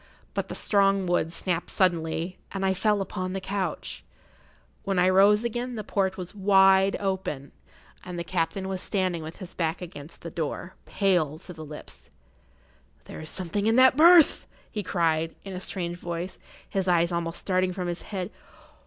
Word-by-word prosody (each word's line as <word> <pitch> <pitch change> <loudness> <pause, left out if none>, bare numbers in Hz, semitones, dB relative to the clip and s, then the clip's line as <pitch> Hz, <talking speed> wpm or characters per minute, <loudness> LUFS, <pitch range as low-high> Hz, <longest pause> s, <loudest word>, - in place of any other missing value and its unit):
But - - -2
the - - -5
strong 195 -2 +2
wood 175 -2 +1
snapped 175 0 -2
suddenly, 170 -1 0
and 195 0 -2
I 190 - +3
fell 205 +2 +1
upon 185 -1 -4
the 195 - -2
couch. 190 0 -4 0.8
When 195 -2 -1
I 180 0 +4
rose 200 +3 +5
again 240 +1 -3
the 215 - -4
port 190 -2 -1
was 180 +1 -7
wide 195 -1 +5
open, 190 -8 -3 0.5
and 180 -1 -7
the 170 - -2
captain 175 +2 -2
was 190 -1 -3
standing 185 -4 -1
with 160 +1 -7
his 185 -1 -9
back 165 -1 -1
against 165 -3 -10
the 170 - -7
door, 165 +3 -4
pale 175 -7 +1
to 180 +2 -11
the 160 -1 -9
lips. 150 0 -11 1.0
"There - - -9
is 155 - -7
something 190 +3 -2
in 225 - +3
that 260 +1 +7
berth!" 335 +1 +6 0.2
he 210 - -3
cried, 165 -4 0
in 195 - -7
a 180 - -4
strange 175 -2 -3
voice, 175 +1 -5 0.3
his 190 -1 -2
eyes 170 -1 +3
almost 170 -1 -2
starting 185 -1 +1
from 180 -1 -4
his 175 0 -4
head. 190 -1 -5
185 Hz, 175 wpm, -26 LUFS, 170-195 Hz, 1.0 s, that